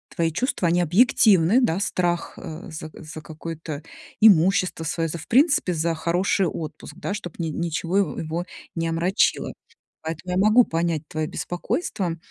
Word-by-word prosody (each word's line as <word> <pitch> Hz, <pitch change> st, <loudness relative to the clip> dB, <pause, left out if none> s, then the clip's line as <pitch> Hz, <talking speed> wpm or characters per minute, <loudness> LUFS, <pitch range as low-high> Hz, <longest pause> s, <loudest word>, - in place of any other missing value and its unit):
твои 165 Hz, -1 st, +1 dB
чувства, 190 Hz, -, 0 dB
они 175 Hz, +1 st, +2 dB
объективны, 200 Hz, -, +4 dB
да, 190 Hz, -4 st, +1 dB
страх, 175 Hz, -3 st, -1 dB
а, 160 Hz, +4 st, -8 dB
за 155 Hz, 0 st, -7 dB
за 155 Hz, 0 st, -9 dB
какое-то 160 Hz, -1 st, -7 dB, 0.4 s
имущество 185 Hz, -4 st, +4 dB
свое, 165 Hz, +1 st, -1 dB
за 170 Hz, -, -4 dB
в 165 Hz, -, -11 dB
принципе, 280 Hz, -, +3 dB
за 165 Hz, +1 st, 0 dB
хороший 180 Hz, +3 st, +1 dB
отпуск, 155 Hz, -1 st, -7 dB
да, -, -, -4 dB
чтобы 200 Hz, -5 st, -6 dB
ни 165 Hz, -1 st, -1 dB
ничего 170 Hz, +3 st, -2 dB
его 200 Hz, -, +1 dB
его 165 Hz, +2 st, -3 dB, 0.3 s
не 165 Hz, -1 st, -1 dB
омрачило. 170 Hz, +5 st, +1 dB, 0.5 s
Поэтому 160 Hz, +3 st, -5 dB
я -, -, +1 dB
могу 215 Hz, +5 st, +6 dB
понять 165 Hz, -4 st, -1 dB
твое 155 Hz, 0 st, -2 dB
беспокойство. 180 Hz, -, -3 dB
170 Hz, 155 wpm, -24 LUFS, 160-195 Hz, 0.5 s, могу